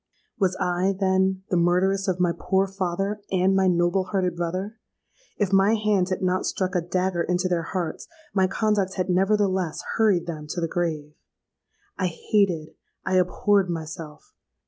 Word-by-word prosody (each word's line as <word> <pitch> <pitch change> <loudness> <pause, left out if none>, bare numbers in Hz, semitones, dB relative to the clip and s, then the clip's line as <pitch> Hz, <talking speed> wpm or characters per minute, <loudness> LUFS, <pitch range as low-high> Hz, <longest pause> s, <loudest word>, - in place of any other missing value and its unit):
"Was 185 -3 +2
I, 180 +2 +1
then, 190 0 +1
the 180 - +3
murderess 185 +3 +2
of 180 -1 0
my 180 -1 +3
poor 190 0 +1
father 195 +2 -3
and 190 +1 +2
my 190 -1 +3
noble 175 +1 +2
hearted 185 -1 -1
brother? 185 +6 -4 0.6
If 200 -2 0
my 195 +3 +5
hand 210 -4 +1
had 185 0 -2
not 185 0 +1
struck 185 -1 -2
a 180 - +1
dagger 180 +1 -1
into 180 +1 0
their 175 -2 0
hearts, 170 -1 -4 0.3
my 190 -2 +3
conduct 205 -2 0
had 185 -1 -1
nevertheless 190 -2 +1
hurried 210 -6 +3
them 155 -3 -6
to 175 +4 -4
the 165 - 0
grave. 155 -3 -3 0.9
I 185 - +1
hated—I 185 -1 -2
abhorred 190 +1 +2
myself. 160 -2 -7
185 Hz, 155 wpm, -24 LUFS, 175-195 Hz, 0.9 s, my